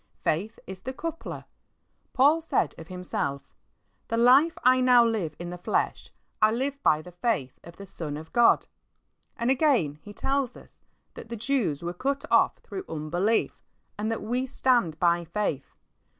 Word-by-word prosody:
Faith 205 +8 -1
is 190 -1 -9
the 260 +5 -5
coupler. 330 +4 -6 0.7
Paul 290 +5 +4
said 325 - 0
of 165 - -10
himself, 170 -6 -4 0.5
"The 230 - -1
life 265 +8 +5
I 255 0 +5
now 250 -2 +6
live 200 -10 -1
in 175 0 -6
the 180 - -7
flesh - - -1 0.3
I 215 - +6
live 270 +5 -2
by 155 - +3
the 180 - -11
faith 175 - -2
of 170 0 -12
the 200 - -9
Son 155 -5 -6
of 160 +1 -11
God." 240 -1 +5 0.7
And 235 +1 +1
again 250 - +2
he 205 - -11
tells 270 +3 -1
us - - -13 0.3
that 230 - -11
the 235 - -4
Jews 225 - -1
were 175 +1 -3
cut 275 +9 -2
off - - +4
through 385 0 -8
unbelief, 175 +9 -1 0.3
and 210 +1 -2
that 225 - -3
we 250 +4 -1
stand 240 - +1
by 175 -1 +2
faith. 170 -5 -3
220 Hz, 165 wpm, -27 LUFS, 170-255 Hz, 0.7 s, now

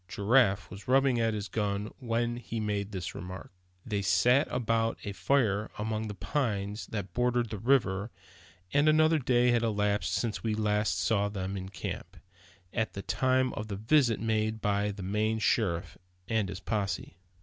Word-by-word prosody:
Giraffe 100 -1 +2
was 100 +1 -10
rubbing 135 -1 +3
at 115 -1 +1
his 105 -1 -4
gun 105 +1 -2
when 120 -1 -1
he 115 -1 -5
made 105 -1 -2
this 95 -4 -4
remark. 90 +1 -8 0.3
They 105 -4 -1
sat 125 +8 +4
about 115 -2 0
a 100 - -4
fire 105 -2 +1
among 110 +1 -2
the 105 - -6
pines 105 -2 -2
that 100 -4 -5
bordered 120 0 +1
the 105 - -4
river; 110 -4 +2 0.6
and 145 +2 +4
another 155 +1 +4
day 125 -2 +3
had 120 -1 +3
elapsed 105 -2 0
since 115 -3 -2
we 110 -2 -1
last 105 -1 +1
saw 100 -2 +1
them 95 -1 -4
in 95 -1 -5
camp, 90 -5 -6 0.6
at 110 -2 -1
the 100 - -6
time 130 +6 +1
of 110 - -5
the 100 - -4
visit 115 +2 +3
made 110 0 0
by 105 0 +1
the 100 -1 -6
Maine 105 +3 0
sheriff, 105 -6 0 0.3
and 110 -3 0
his 95 - -5
posse. 100 -2 -3
110 Hz, 170 wpm, -30 LUFS, 100-120 Hz, 0.6 s, sat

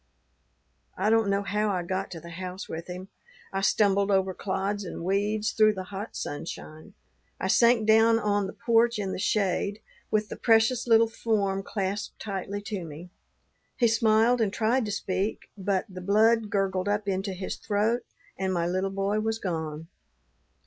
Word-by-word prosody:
"I 205 +3 +2
don't 225 -2 +3
know 200 0 +1
how 210 +1 0
I 185 -3 -1
got 185 +2 -3
to 170 - -7
the 170 +1 -11
house 185 +2 -6
with 165 +1 -6
him; 185 +2 -7 0.4
I 195 - -1
stumbled 200 0 +3
over 190 -1 +2
clods 200 +2 -2
and 175 - -6
weeds, 205 +3 0
through 215 -1 +4
the 190 - -4
hot 200 +4 -6
sunshine. 155 +4 -7 0.4
I - - -2
sank 235 +2 +4
down 225 +1 +5
on 205 -2 0
the - - -7
porch 235 0 +2
in 195 -2 -2
the - - -4
shade, 200 +1 0 0.3
with 215 -1 0
the - - -5
precious 225 +2 +3
little 230 -1 +6
form 205 -4 0
clasped 195 0 -3
tightly 200 0 -4
to 205 -3 -4
me. 165 +3 -9 0.7
He 240 -2 +4
smiled, 225 +2 +3
and 210 -3 +2
tried 230 +4 +1
to 210 - -3
speak, 195 0 -2
but 195 -1 -1
the 185 -1 -9
blood 215 +3 +3
gurgled 195 -1 0
up 205 0 -1
into 195 0 -1
his 185 0 -4
throat 220 +3 0 0.4
and 190 -1 0
my 170 -2 0
little 185 +2 0
boy 195 +2 -1
was 220 +1 -1
gone. 160 -5 -4
200 Hz, 170 wpm, -27 LUFS, 190-220 Hz, 0.7 s, little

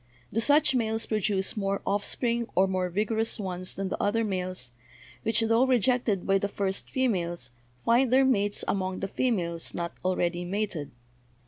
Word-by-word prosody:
Do 225 - +1
such 290 +5 +4
males 225 -2 0
produce 205 -3 0
more 195 -2 -1
offspring 235 +4 0
or 190 +1 +4
more 185 -1 -1
vigorous 220 +5 0
ones 185 -2 -3
than 195 -1 -3
the - - -3
other 225 +3 +1
males, 185 - -3 0.5
which, 225 0 +2
tho 225 +2 +3
rejected 245 -5 +2
by 195 0 +3
the 200 - -1
first 195 -1 -3
females, 175 - -1 0.3
find 240 +2 +4
their 265 +1 +5
mates 205 -5 +2
among 185 -1 -1
the 195 - -1
females 180 -8 -1
not 170 0 -3
already 175 -1 0
mated? 185 -5 -3
200 Hz, 155 wpm, -28 LUFS, 185-230 Hz, 0.5 s, their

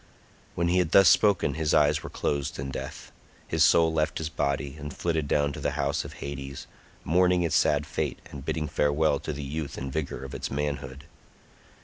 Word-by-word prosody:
When 85 0 +1
he 90 +1 +3
had 90 -2 0
thus 95 -3 +8
spoken 95 -5 +4
his 80 +1 0
eyes 75 0 +4
were - - -7
closed 70 -1 -2
in 70 0 -4
death, - - -7 0.4
his - - +2
soul 80 -1 +5
left 80 -1 0
his 80 -1 -3
body 70 -2 -2
and 75 0 -6
flitted 80 -2 -1
down 70 0 +1
to - - -7
the 75 - -1
house 70 0 0
of - - -9
Hades, 70 -1 -7 0.4
mourning 90 +2 +3
its 85 - 0
sad - - +3
fate - - -3
and 70 -2 -8
bidding 75 +1 -2
farewell 75 +1 +1
to 75 - -4
the 75 0 -5
youth 75 +1 -5
and 65 0 -5
vigor 70 -4 -3
of 65 - -9
its - - -4
manhood. 70 -1 -4
75 Hz, 200 wpm, -27 LUFS, 70-80 Hz, 0.4 s, thus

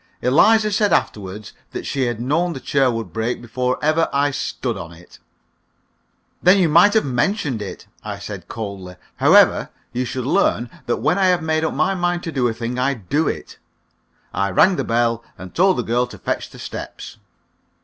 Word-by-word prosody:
Eliza 215 - +4
said 205 0 +2
afterward 100 0 -2 0.2
that - - -5
she 135 -3 -1
had 120 -2 -3
known 165 +8 0
the 135 - -6
chair 135 0 +2
would 115 -7 -4
break 115 +4 -2
before 125 +2 -2
ever 155 +2 +2
I 140 +1 +1
stood 130 -3 -3
on 85 -3 -8
it. 85 +1 -17 1.2
"Then 180 +3 +6
you 185 -3 +4
might 175 +7 +5
have 220 - +3
mentioned 135 - -1
it," 100 - -7 0.2
I 105 -2 -5
said, 100 -3 -8
coldly. 100 -5 -7 0.2
"However, - - +5 0.2
you 125 +1 -1
shall 130 +1 -4
learn 120 -2 +1 0.2
that 120 - +1
when 180 +5 +1
I 190 - +4
have 180 -2 +2
made 160 0 0
up 160 - -1
my 155 +7 +2
mind 175 -1 -1
to 165 - -4
do 130 -5 +1
a - - 0
thing, 120 +2 -4
I 135 +2 +1
do 140 - -1
it." - - -5 0.7
I 100 +1 0
rang 180 - +4
the - - -1
bell, 115 0 0
and 90 +1 -10
told 185 +1 +3
the - - 0
girl 120 +2 0
to - - -11
fetch - - -3
the - - -14
steps. - - -8
125 Hz, 190 wpm, -20 LUFS, 115-165 Hz, 1.2 s, Then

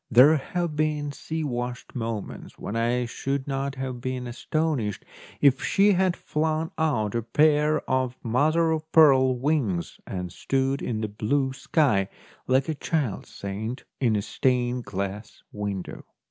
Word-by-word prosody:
There 135 +7 +7
have 170 +2 -3
been 150 -1 0
sea 160 +2 -4
washed 125 -2 -4
moments 115 -4 -5
when 105 - -5
I 120 +2 +1
should 135 +3 -3
not 135 0 -2
have 130 -2 -4
been 130 0 -3
astonished 125 - -2 0.4
if 135 -2 +5
she 200 +1 +4
had 185 -2 +2
flung 155 +2 -1
out 120 -11 0
a 120 - 0
pair 150 +5 +2
of 130 -1 0
mother 155 +8 +2
of 160 0 -3
pearl 130 -5 +6
wings 120 - -1
and 90 -2 -4
stood 135 +4 0
in 110 -2 -2
the 110 - -1
blue 130 +6 0
sky, 125 - +1 0.4
like 130 +1 +3
a 160 - 0
child 145 - -2
saint 110 +6 -5 0.2
in 115 -5 +2
a 100 - 0
stained 125 -1 0
glass 100 +1 -5
window. 100 -3 -5
130 Hz, 145 wpm, -26 LUFS, 115-150 Hz, 0.4 s, There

